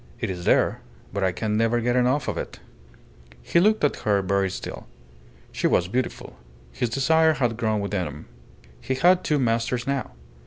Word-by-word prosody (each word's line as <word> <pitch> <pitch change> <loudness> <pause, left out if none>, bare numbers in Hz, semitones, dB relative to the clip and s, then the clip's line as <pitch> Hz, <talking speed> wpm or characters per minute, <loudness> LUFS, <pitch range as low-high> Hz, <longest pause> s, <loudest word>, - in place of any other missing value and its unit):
It - - -2
is 90 -1 -6
there, - - +2 0.3
but 100 0 -1
I 95 - +2
can 105 +4 -2
never 115 +1 +2
get 120 +1 0
enough 125 +3 +2
of - - -1
it." - - -6 0.8
He - - +2
looked 215 +2 +3
at 145 - +2
her 100 -2 +1
very 95 +1 +1
still. - - -7 0.6
She - - 0
was 90 - +2
beautiful. 125 +6 -3 0.4
His 115 - -1
desire 160 +6 +3
had 120 -6 0
grown 110 -2 0
within 100 -3 -2
him. 75 +1 -9 0.6
He 130 - -2
had 180 +6 +4
two 150 - +1
masters 120 -1 0
now. 140 -1 -2
115 Hz, 180 wpm, -24 LUFS, 100-135 Hz, 0.8 s, had